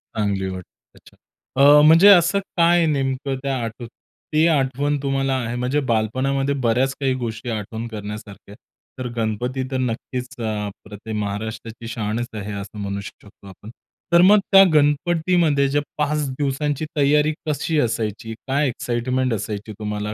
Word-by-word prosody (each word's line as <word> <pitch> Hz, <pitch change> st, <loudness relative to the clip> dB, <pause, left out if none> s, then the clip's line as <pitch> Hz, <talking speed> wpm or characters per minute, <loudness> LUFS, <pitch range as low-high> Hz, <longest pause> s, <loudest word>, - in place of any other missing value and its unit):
चांगली 100 Hz, -3 st, -1 dB
वाटते. 95 Hz, -1 st, -8 dB, 0.3 s
अच्छा. -, -, -20 dB, 0.5 s
अ, 145 Hz, +1 st, +8 dB
म्हणजे 165 Hz, +5 st, +7 dB
असं 185 Hz, +1 st, +6 dB, 0.2 s
काय 170 Hz, 0 st, +4 dB
नेमकं 135 Hz, -1 st, -1 dB
त्या 135 Hz, -1 st, -1 dB
आठव 115 Hz, +2 st, -6 dB, 0.5 s
ते 155 Hz, +2 st, +4 dB
आठवण 145 Hz, -1 st, +1 dB
तुम्हाला 135 Hz, -1 st, 0 dB
आहे. 115 Hz, +1 st, -4 dB
म्हणजे 125 Hz, +4 st, 0 dB
बालपणामध्ये 135 Hz, +5 st, 0 dB
बऱ्याच 130 Hz, +4 st, +2 dB
काही 135 Hz, -2 st, +1 dB
गोष्टी 120 Hz, -1 st, -5 dB
आठवण 110 Hz, +1 st, -4 dB
करण्यासारख्या, 105 Hz, -2 st, -9 dB, 0.4 s
तर 125 Hz, -, -3 dB
गणपती 120 Hz, +4 st, -2 dB
तर 130 Hz, -, -1 dB
नक्कीच 125 Hz, +1 st, -3 dB
अ, -, -, -4 dB, 0.2 s
अप्रतिम 105 Hz, +2 st, -8 dB
महाराष्ट्राची 110 Hz, +3 st, -6 dB
शानच 115 Hz, +1 st, -3 dB
आहे, 105 Hz, -1 st, -5 dB
असं 100 Hz, +1 st, -7 dB
म्हणू 100 Hz, 0 st, -4 dB
शकतो 100 Hz, 0 st, -13 dB
आपण. 95 Hz, +3 st, -12 dB, 0.4 s
तर 170 Hz, -, +7 dB
मग 210 Hz, +1 st, +7 dB
त्या 195 Hz, 0 st, +9 dB
गणपतीमध्ये 155 Hz, 0 st, +2 dB
ज्या 145 Hz, +1 st, +1 dB, 0.2 s
5 150 Hz, -1 st, 0 dB
दिवसांची 145 Hz, +2 st, -2 dB
तयारी 150 Hz, +2 st, +3 dB
कशी 150 Hz, +1 st, 0 dB
असायची? 115 Hz, -2 st, -2 dB
काय 140 Hz, +2 st, +1 dB
एक्साईटमेंट 125 Hz, +1 st, -1 dB
असायची 105 Hz, 0 st, -4 dB
तुम्हाला? 105 Hz, 0 st, -3 dB
130 Hz, 145 wpm, -21 LUFS, 110-145 Hz, 0.5 s, त्या